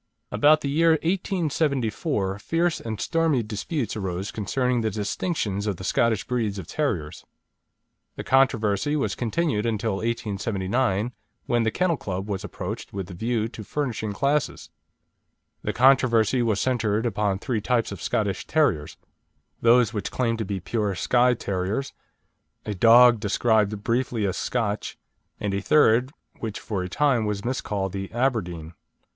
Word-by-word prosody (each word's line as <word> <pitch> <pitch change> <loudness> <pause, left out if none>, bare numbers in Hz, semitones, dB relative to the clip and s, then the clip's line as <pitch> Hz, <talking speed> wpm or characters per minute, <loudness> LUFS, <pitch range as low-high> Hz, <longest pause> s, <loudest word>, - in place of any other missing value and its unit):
About 155 +1 +4
the - - -2
year 165 +2 +4
1874, 150 - -1
fierce 165 +8 0
and 110 -3 -5
stormy 165 -5 +1
disputes 110 - -3
arose 95 -1 -3
concerning 125 +4 0
the 110 - 0
distinctions 105 - -2
of 100 -4 -1
the 95 - -9
Scottish 110 +2 +1
breeds 110 -5 -1
of 95 - -6
terriers. 90 - -3 0.9
The - - -6
controversy 130 -1 +2
was 145 - 0
continued 125 -1 -1
until 110 -2 -1
1879, 105 0 -1 0.3
when 120 -1 +1
the 110 - +2
Kennel 175 +5 0
Club 95 -2 -4
was 100 -1 -3
approached 105 +1 -6
with 95 -2 -5
the - - -7
view 110 +4 -1
to 110 -2 -9
furnishing 115 -3 -3
classes. 140 +7 -1 0.9
The - - -2
controversy 125 -2 +4
was 110 -4 +1
centred 115 -3 0
upon 105 -4 0
three 115 +1 -2
types 120 0 0
of 100 -3 -7
Scottish 100 +2 -1
terriers: 120 - +1 0.6
those 120 -1 +4
which 105 -3 -3
claimed 115 -3 -1
to 110 - -2
be 95 0 -3
pure 105 +1 -2
Skye 125 +7 +3
Terriers, 100 +6 -3 0.7
a 105 - -2
dog 115 +3 +7
described 105 -1 +1
briefly 120 -2 0
as 95 - -1
Scotch, 110 -4 -2 0.4
and 100 -1 -2
a 100 - -1
third, 125 +1 +4 0.3
which 110 -2 -4
for 100 -4 -3
a 90 - -4
time 135 +1 +2
was 105 0 -3
miscalled 105 -6 -2
the 95 0 -5
Aberdeen. 95 -10 -1
110 Hz, 145 wpm, -25 LUFS, 100-130 Hz, 0.9 s, dog